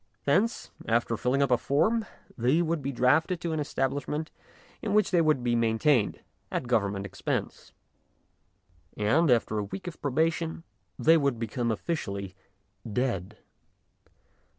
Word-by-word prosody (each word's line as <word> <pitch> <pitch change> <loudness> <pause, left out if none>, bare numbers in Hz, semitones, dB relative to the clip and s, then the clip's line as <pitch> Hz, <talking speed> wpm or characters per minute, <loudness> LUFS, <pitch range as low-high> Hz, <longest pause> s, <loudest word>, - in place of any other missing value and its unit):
Thence, 205 +11 +1 0.2
after 115 0 +1
filling 130 +5 +1
up 140 - 0
a 125 - +4
form, 215 +11 +1 0.3
they 130 +8 +2
would 165 -1 -1
be 140 +1 -2
drafted 150 +8 +2
to 170 -2 -2
an 155 - -1
establishment 145 +2 -2 0.5
in 210 -2 -1
which 210 -2 +3
they 175 -3 +4
would 155 -5 +2
be 120 -1 +1
maintained 115 +1 +2 0.3
at - - -2
Government 100 -5 0
expense, 95 -1 -4 1.3
and, 140 +11 +3
after 115 -3 +2
a - - -1
week 190 - -7
of 175 -3 -7
probation, 160 +3 0 0.3
they 165 +1 +5
would 140 -5 +1
become 115 +1 -2
officially 100 - -3 0.6
dead. 110 -4 -2
135 Hz, 135 wpm, -28 LUFS, 115-160 Hz, 1.3 s, they